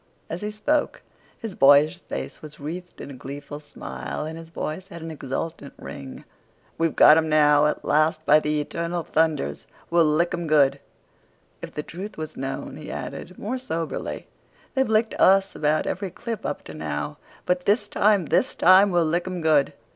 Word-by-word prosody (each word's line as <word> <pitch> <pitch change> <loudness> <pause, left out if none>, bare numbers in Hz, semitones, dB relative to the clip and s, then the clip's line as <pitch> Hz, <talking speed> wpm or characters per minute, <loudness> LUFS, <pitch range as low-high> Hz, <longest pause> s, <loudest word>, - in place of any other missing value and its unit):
As 170 - -4
he 210 - -3
spoke 290 +8 -1 0.3
his 225 -4 -6
boyish 145 +3 +5
face - - -6
was 155 -1 -11
wreathed 175 +5 -7
in 140 - -8
a - - -8
gleeful 140 +3 -8
smile, 150 0 -6
and 160 +1 -6
his 165 0 -10
voice 165 +3 -5
had 170 -4 -9
an 165 - -6
exultant 145 +1 -5
ring. 135 -2 -9 0.6
"We've 165 -1 +1
got 150 - +8
'em 160 -1 +1
now. 150 -1 +5
At 150 - -3
last, 155 +1 +2
by 150 +1 +6
the 150 0 -1
eternal 170 +3 -3
thunders, 155 - 0 0.2
we'll 170 -1 +5
lick 155 +4 +2
'em 175 -1 -3
good!" 140 -2 +4 0.8
"If - - -8
the 150 - -3
truth 195 +7 -8
was 155 0 -6
known," 135 +1 -5
he 155 - -9
added, 180 +1 -7
more 250 +5 -3
soberly, 165 -10 -4 0.5
"they've 265 -3 +1
licked 220 +1 +2
us 195 +1 +5
about 150 +1 +1
every 195 - -3
clip 230 +5 -5
up - - -4
to - - -10
now; - - -4 0.3
but 180 0 0
this 205 +1 +3
time—this 205 -5 +2
time—we'll 185 -2 +5
lick 170 +3 0
'em 185 -1 -3
good!" 155 -4 +3
160 Hz, 175 wpm, -24 LUFS, 150-185 Hz, 0.8 s, got